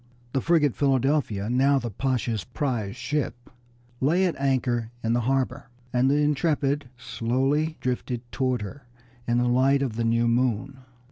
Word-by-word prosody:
The 135 - +1
frigate 155 -5 +3
Philadelphia, 135 -6 +1
now 135 +4 +3
the 120 -3 -3
Pasha's 120 -2 -1
prize 115 -4 -3
ship, 135 -3 -3 0.5
lay 170 +8 +3
at 175 - 0
anchor 125 -4 0
in 115 +1 +1
the 120 - +2
harbor, 135 +2 -1 0.2
and 125 +2 +3
the 140 - +3
Intrepid 145 -2 +1
slowly 135 +7 0
drifted 125 -1 -2
toward 130 -4 0
her 125 +6 -9 0.4
in 120 0 +2
the 125 0 +2
light 135 +3 +3
of 115 -5 -3
the 115 - 0
new 115 +1 +2
moon. 125 +2 0
130 Hz, 150 wpm, -25 LUFS, 120-140 Hz, 0.5 s, frigate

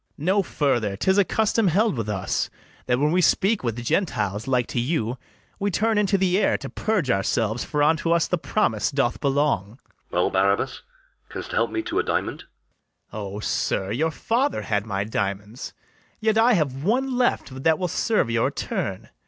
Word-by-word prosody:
No 190 +7 +2
further: 120 - 0
'tis 190 - +2
a - - +6
custom 220 +1 +1
held 205 +3 +2
with 115 -3 -3
us, 95 -3 -1 0.4
That 125 - +2
when 150 +3 +2
we 180 +2 +3
speak 195 +3 +2
with 115 -2 -2
Gentiles 110 - -1
like 125 -2 +2
to - - -1
you, 125 -2 -1 0.4
We 200 - 0
turn 220 +3 +1
into 200 -1 +2
the 190 0 +2
air - - +2
to - - -8
purge 205 - 0
ourselves; 110 +3 0
For 150 -1 0
unto 160 +2 +2
us 170 -1 +3
the 180 - 0
promise 115 - 0
doth 135 -4 0
belong. 135 -7 0
LODOWICK. - - -40 0.3
Well, 90 +1 +1
Barabas, 100 +1 +1 0.5
canst - - -7
help - - +1
me 335 - -2
to 350 +3 -1
a - - +2
diamond? - - -2 0.7
BARABAS. 100 -2 -6
O, - - -5
sir, 95 -2 -1
your 155 +9 +1
father 245 - -1
had 105 0 -1
my 100 -2 -1
diamonds: 105 +2 -4 0.5
Yet 220 0 +1
I 230 +2 +5
have 140 -7 0
one 255 +7 +1
left 145 - 0
that 160 +2 +3
will 180 - -1
serve 195 - +1
your 115 -1 +2
turn. - - -4
145 Hz, 185 wpm, -24 LUFS, -, 0.7 s, a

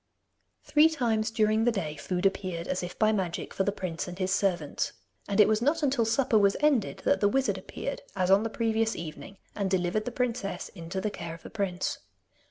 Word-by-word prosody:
Three 310 +1 +5
times 230 -8 0
during 220 0 +2
the 240 - +4
day 165 -9 -3
food 180 +5 -3
appeared, 185 -3 -1
as 185 - -1
if 180 0 -6
by 215 0 +4
magic, 185 -5 -2
for 195 - 0
the 200 - +1
prince 180 -4 -4
and 180 0 -7
his 190 0 0
servants. 180 -7 0 0.3
And 200 +1 -1
it 210 - +8
was 215 0 +2
not 300 +5 +1
until 265 -5 +2
supper 225 -1 +3
was 200 -1 +3
ended 290 -8 +1
that 285 - +3
the 205 - +4
wizard 205 -5 +1
appeared, 280 +8 -5
as 185 -1 +1
on 195 +1 +6
the 225 - -2
previous 225 0 0
evening, 170 +4 -8 0.2
and 200 -2 -1
delivered 185 +3 0
the 245 - -3
princess 235 -7 -2
into 175 +1 -5
the 210 - -1
care 165 -3 -6
of 165 - -16
the - - -10
prince. 195 -4 -2
200 Hz, 210 wpm, -28 LUFS, 185-225 Hz, 0.3 s, it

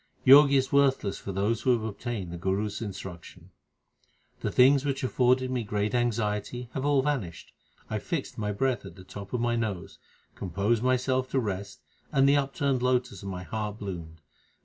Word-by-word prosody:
Jog 140 +2 +9
is 135 -1 +2
worthless 135 -8 +2
for 100 - -6
those 100 +4 0
who 130 - +3
have 115 -2 -1
obtained 105 -3 -4
the 85 - -6
Guru 95 +4 0
s 105 +1 -5
instruction: 95 -3 -8 0.9
The - - -2
things 135 +2 +5
which 140 -2 -2
afforded 130 0 +2
me 125 -2 -1
great 105 +1 -1
anxiety 120 0 -1
have 135 - -3
all 145 -2 +3
vanished. 120 - -3 0.3
I 110 - -2
fixed 160 - -4
my 105 -2 -2
breath 125 +3 0
at 85 - -10
the 95 - -12
top 100 +1 -9
of 125 - -1
my 120 0 +1
nose, 105 -7 -4 0.3
composed 100 +5 -1
myself 130 +1 +1
to 135 - +1
rest, 100 -3 -4 0.3
and 135 0 +4
the 140 - +5
upturned 140 -1 0
lotus 125 -5 0
of 100 - -6
my 90 -1 -5
heart 105 0 -4
bloomed. 85 -6 -7
115 Hz, 180 wpm, -28 LUFS, 100-130 Hz, 0.9 s, Jog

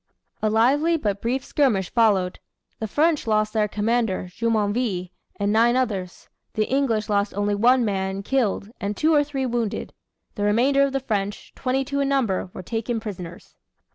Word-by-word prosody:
A 215 - +2
lively 280 +10 +3
but 205 -8 -2
brief 255 +3 -1
skirmish 225 -13 +1
followed. 200 -6 +2 0.4
The 220 - -3
French 300 +4 +1
lost 215 -1 +1
their 215 -2 +2
commander, 210 -3 -1
Jumonville, 210 -3 0 0.3
and 200 0 +1
nine 235 +2 +4
others. 200 -8 -2 0.3
The 215 - +1
English 240 -5 0
lost 205 -1 0
only 205 0 0
one 240 +4 +4
man, 195 -1 -2
killed, 220 -4 0
and 200 +1 -3
two 315 +1 +3
or 295 -1 +5
three 275 -2 -3
wounded. 235 -4 -2 0.4
The - - -6
remainder 245 +7 +3
of 275 -1 +2
the 270 - 0
French, 205 -4 -3
twenty 265 +1 -1
two 280 +1 -2
in 275 0 +1
number, 230 -10 0
were 185 - -8
taken 225 +3 -2
prisoners. 180 -5 -8
220 Hz, 170 wpm, -23 LUFS, 205-260 Hz, 0.4 s, or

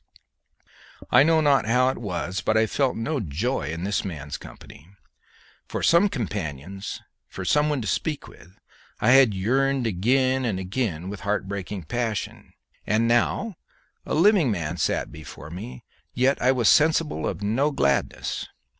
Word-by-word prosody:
I 125 - +7
know 160 +2 +4
not 140 -6 +3
how 125 +2 +3
it 130 - -4
was, 95 -4 -3
but 110 - +1
I 110 - +4
felt 130 +4 0
no 140 +6 -2
joy 95 - -2
in 85 +2 -4
this 100 +1 -1
man's 75 -7 -6
company. 70 - -12 0.8
For - - -4
some 170 +5 +5
companion, 95 - -5 0.5
for 95 - -7
some 150 - +3
one 145 -4 -1
to 110 - -4
speak 155 +6 -2
with, 90 +2 -17 0.4
I 115 - +3
had 130 -6 +6
yearned 130 +6 +1
again 130 +6 +1
and 110 -6 -1
again 95 -3 -3
with 100 0 -6
heart 100 0 -2
breaking 100 -1 -5
passion; 115 +5 -4 0.3
and 110 +2 +2
now 160 - +1 0.5
a - - -3
living 180 - +4
man 85 -5 -2
sat - - -1
before 75 0 -10
me, 65 -8 -8 0.3
yet 130 +3 +2
I 125 - +4
was 125 -4 +1
sensible 155 +3 +3
of 105 - -4
no 125 +8 +1
gladness. 70 - -1
110 Hz, 155 wpm, -24 LUFS, 95-135 Hz, 0.8 s, I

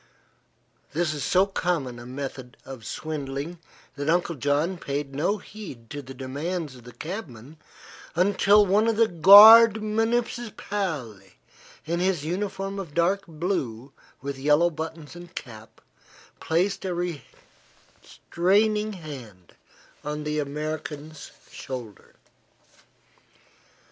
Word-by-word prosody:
This 165 0 0
is 145 - -4
so 185 +1 +3
common 165 -11 -2
a 120 - -10
method 130 -1 -7
of 130 -5 -9
swindling 150 +2 -5 0.4
that 145 +1 -3
Uncle 170 0 +1
John 150 +5 0
paid 140 -1 -4
no 170 +9 0
heed 185 - -11
to 145 -1 -5
the 135 0 -11
demands 145 +4 -4
of 125 -1 -15
the 125 - -10
cabman 150 - -8 0.6
until 200 +3 +4
one 205 +4 +3
of 225 -2 +1
the 230 0 +5
Guard 210 +5 +9
Municipale, 210 - -2 0.7
in 170 +2 -1
his 180 -5 0
uniform 195 +2 -3
of 170 -7 -8
dark 190 +4 +1
blue 145 - -3 0.3
with 140 -1 -5
yellow 150 +5 +3
buttons 160 0 -7
and 175 0 -12
cap, 110 -4 -10 0.6
placed 190 +5 0
a 185 -2 -2 1.1
restraining 210 +4 0
hand 130 - -10 0.5
upon 150 0 -5
the 150 0 -2
American's 150 +1 -5 0.2
shoulder. 120 -7 -8
160 Hz, 115 wpm, -25 LUFS, 140-195 Hz, 1.1 s, Guard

